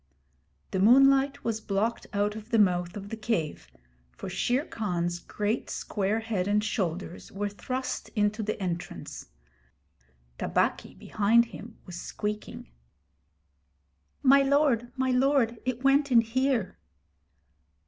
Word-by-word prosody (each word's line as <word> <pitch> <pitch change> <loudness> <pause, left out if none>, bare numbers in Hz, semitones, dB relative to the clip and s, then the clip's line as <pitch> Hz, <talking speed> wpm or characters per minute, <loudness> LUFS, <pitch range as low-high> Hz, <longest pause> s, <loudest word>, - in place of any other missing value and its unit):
The 190 - -1
moonlight 270 +5 +5
was 225 -1 -2
blocked 210 +3 -1
out 205 +1 0
of 220 +1 -9
the 235 - +2
mouth 180 -2 +2
of 200 0 -8
the 225 - -4
cave, 195 - -2 0.5
for - - -6
Shere 245 - 0
Khan's 175 - -2
great 210 +5 -3
square 210 +2 -1
head 210 -5 -2
and 210 +1 +2
shoulders 185 -4 -3
were 205 +1 -2
thrust 255 +5 -4
into 210 +1 +1
the 215 +1 -3
entrance. 175 -3 -5 1.1
Tabaqui, - - 0
behind 220 +3 +3
him, 225 +2 -10
was 175 -2 -7
squeaking: 210 - -5 1.5
'My 275 +1 +7
lord, 275 -4 +2
my 260 0 +1
lord, 250 -3 +2
it 255 0 -2
went 275 +1 +3
in 235 -2 +7
here!' 235 -3 -1
220 Hz, 125 wpm, -28 LUFS, 200-255 Hz, 1.5 s, My